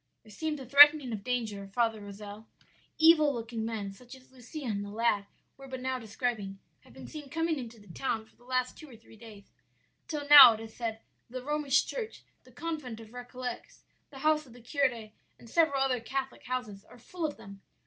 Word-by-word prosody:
"'There 215 - -16
seems 305 +7 -3
a 265 - -8
threatening 285 0 +7
of 205 -2 -5
danger, 220 -5 -3
Father 225 -3 +1
Rozel; 205 +1 -10 0.5
evil 315 -2 +6
looking 230 -1 -5
men, 220 -3 -4
such 245 +5 -13
as 260 0 -19
Lucia 260 +4 -9
and 205 -4 -2
the 205 - -7
lad 210 -2 0 0.3
were 270 0 -12
but 260 -1 -6
now 260 0 -2
describing, 220 -3 -3 0.2
have - - -21
been - - -11
seen 300 -3 -9
coming 325 0 -1
into 235 -2 -9
the 205 - -18
town 225 -2 -2
for - - -27
the - - -24
last 255 0 -1
two 310 - -12
or 245 - -13
three 225 0 -18
days; 215 -3 -14 0.6
till 295 -2 -4
now, 285 -5 +11
it - - -10
is 220 0 -10
said, 225 -2 -4 0.3
the 255 +1 -6
Romish 295 -1 +1
church, 460 -3 -6 0.2
the - - -18
convent 300 -9 -5
of 225 -1 -12
Récollets, 245 0 -8 0.3
the 275 - -13
house 305 -1 +2
of 240 - -15
the 245 - -14
curé, 240 -4 -1 0.3
and 235 - -16
several 280 0 +2
other 255 -2 0
Catholic 265 +3 -5
houses 215 -6 -4
are 245 - -16
full 335 +9 -8
of 300 -2 -2
them. 195 0 -12
245 Hz, 205 wpm, -30 LUFS, 220-280 Hz, 0.6 s, now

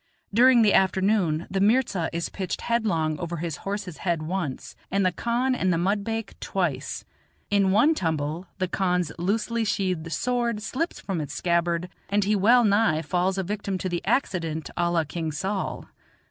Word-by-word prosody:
During 245 +1 +6
the 210 - +4
afternoon 190 -4 +2
the 195 - 0
mirza 205 -6 +2
is 170 0 -2
pitched 190 -3 -4
headlong 180 -10 0
over 170 0 -4
his 165 -1 -3
horse's 195 -4 -5
head 170 -4 -1
once, 160 -5 -4
and 195 0 +1
the 185 - +3
khan 240 +7 0
and 185 -7 +1
the 170 - +2
mudbake 205 +5 -1
twice. - - -2 0.5
In 200 -1 +3
one 225 +12 +5
tumble 160 - -2
the 185 -1 0
khan's 180 -2 0
loosely 225 +5 0
sheathed 185 -6 -1
sword 235 0 -1
slips 320 - -2
from 185 -5 -3
its 145 - -6
scabbard, 170 0 +1 0.2
and 205 +1 +2
he 210 +2 +2
well 235 +5 +5
nigh 200 -7 +3
falls 180 +4 0
a 190 - 0
victim 200 0 -3
to 185 - -3
the 175 -1 -3
accident 165 - -1
a 175 -1 +1
la 170 -1 +2
King 160 +1 -4
Saul. 190 +6 -3
190 Hz, 170 wpm, -25 LUFS, 170-210 Hz, 0.5 s, During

